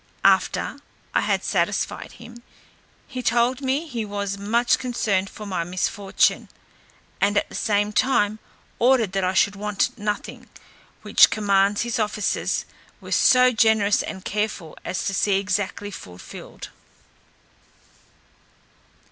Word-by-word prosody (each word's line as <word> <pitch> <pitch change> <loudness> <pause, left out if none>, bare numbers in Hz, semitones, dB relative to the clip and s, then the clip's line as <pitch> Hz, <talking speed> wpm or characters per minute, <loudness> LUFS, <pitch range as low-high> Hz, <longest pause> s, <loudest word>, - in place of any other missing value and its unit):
After - - +2 0.3
I - - +3
had - - 0
satisfied - - -1
him, 240 0 -13 0.7
he 255 -2 -5
told 240 +2 +1
me 275 +4 -1
he 245 -8 -4
was 200 -1 -3
much 225 +5 +1
concerned 205 -6 -1
for 210 - -10
my 185 -4 -2
misfortune, 185 +3 0 0.7
and 205 +1 +2
at - - +1
the - - -14
same 205 0 0
time 215 -4 +2 0.4
ordered 240 -5 +3
that 195 -1 -1
I 185 +1 0
should 200 +2 +3
want 205 0 -1
nothing; 210 0 -4 0.5
which - - +6
commands 200 -1 +2
his 235 -1 -2
officers 210 -1 -1 0.3
were - - -11
so 255 0 +5
generous 220 -3 +3
and 190 -2 -7
careful 210 -6 -3
as 180 - -3
to 195 - -1
see 195 0 +2
exactly 200 +1 -2
fulfilled. 90 - -10
205 Hz, 125 wpm, -23 LUFS, 200-235 Hz, 0.7 s, which